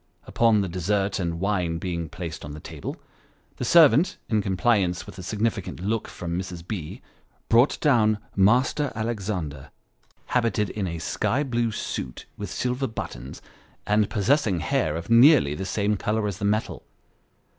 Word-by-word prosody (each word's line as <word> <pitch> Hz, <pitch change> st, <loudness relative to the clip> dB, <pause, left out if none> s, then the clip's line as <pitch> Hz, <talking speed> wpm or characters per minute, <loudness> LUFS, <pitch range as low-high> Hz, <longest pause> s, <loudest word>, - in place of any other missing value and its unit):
Upon 115 Hz, -3 st, +3 dB
the 95 Hz, -, -1 dB
dessert 95 Hz, +3 st, -1 dB
and 85 Hz, -2 st, -2 dB
wine 90 Hz, -4 st, 0 dB
being 85 Hz, -2 st, -4 dB
placed 85 Hz, -1 st, -7 dB
on 75 Hz, -, -7 dB
the 75 Hz, -, -8 dB
table, 80 Hz, -2 st, -7 dB, 0.6 s
the -, -, -4 dB
servant, 160 Hz, -, +5 dB
in 110 Hz, -2 st, +2 dB
compliance 95 Hz, -2 st, +1 dB
with 95 Hz, -, -11 dB
a -, -, -5 dB
significant 105 Hz, +1 st, -2 dB
look 105 Hz, +4 st, -2 dB
from 85 Hz, -1 st, -5 dB
Mrs. 90 Hz, -2 st, -7 dB
B., 90 Hz, -8 st, -6 dB, 0.5 s
brought 120 Hz, +5 st, +4 dB
down 110 Hz, -7 st, +3 dB
" -, -, -31 dB, 0.2 s
Master 130 Hz, +4 st, +1 dB
Alexander," 100 Hz, -, -3 dB, 0.6 s
habited 115 Hz, -4 st, 0 dB
in 100 Hz, -3 st, -3 dB
a 85 Hz, -1 st, -4 dB
sky 130 Hz, -, -1 dB
blue 120 Hz, -4 st, 0 dB
suit 65 Hz, -, -5 dB
with 100 Hz, -2 st, -6 dB
silver 125 Hz, +5 st, -1 dB
buttons; 70 Hz, -, -7 dB, 0.4 s
and 105 Hz, 0 st, +2 dB
possessing 105 Hz, -, +1 dB
hair 80 Hz, 0 st, 0 dB
of 85 Hz, +7 st, -5 dB
nearly 120 Hz, -, +6 dB
the 85 Hz, +6 st, -4 dB
same 105 Hz, +1 st, 0 dB
colour 105 Hz, +2 st, -1 dB
as 100 Hz, -1 st, -4 dB
the 100 Hz, -, -2 dB
metal. 105 Hz, +2 st, -1 dB
105 Hz, 155 wpm, -25 LUFS, 90-115 Hz, 0.6 s, nearly